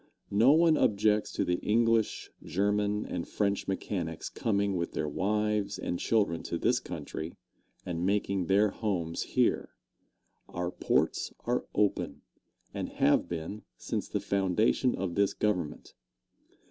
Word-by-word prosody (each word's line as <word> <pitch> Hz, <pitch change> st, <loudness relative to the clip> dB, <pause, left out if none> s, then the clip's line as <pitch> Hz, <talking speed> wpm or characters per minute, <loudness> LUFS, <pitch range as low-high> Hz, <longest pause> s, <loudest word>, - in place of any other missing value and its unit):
No 110 Hz, +7 st, +6 dB
one 160 Hz, 0 st, +5 dB
objects 105 Hz, 0 st, +2 dB
to -, -, 0 dB
the 90 Hz, 0 st, 0 dB
English, 115 Hz, 0 st, +1 dB
German 105 Hz, +3 st, 0 dB
and 85 Hz, -2 st, -4 dB
French 100 Hz, -1 st, -1 dB
mechanics 90 Hz, -4 st, -3 dB
coming 100 Hz, -2 st, 0 dB
with 85 Hz, -1 st, -2 dB
their 75 Hz, -, -1 dB
wives 105 Hz, +5 st, 0 dB
and 90 Hz, -, -3 dB
children 100 Hz, -7 st, +1 dB
to -, -, -3 dB
this -, -, +2 dB
country 80 Hz, +2 st, -6 dB, 0.5 s
and 85 Hz, -1 st, -3 dB
making 100 Hz, -2 st, 0 dB
their 100 Hz, +2 st, +4 dB
homes 90 Hz, -8 st, -2 dB
here. -, -, 0 dB, 0.7 s
Our 90 Hz, 0 st, -3 dB
ports -, -, 0 dB
are -, -, -1 dB
open, 105 Hz, -1 st, 0 dB, 0.5 s
and -, -, -3 dB
have 75 Hz, -, +3 dB
been 85 Hz, +5 st, -5 dB, 0.2 s
since -, -, -3 dB
the -, -, -1 dB
foundation 100 Hz, +6 st, +1 dB
of 95 Hz, -2 st, -3 dB
this 100 Hz, +2 st, +2 dB
Government. 90 Hz, -8 st, -2 dB
100 Hz, 135 wpm, -30 LUFS, 90-105 Hz, 0.7 s, No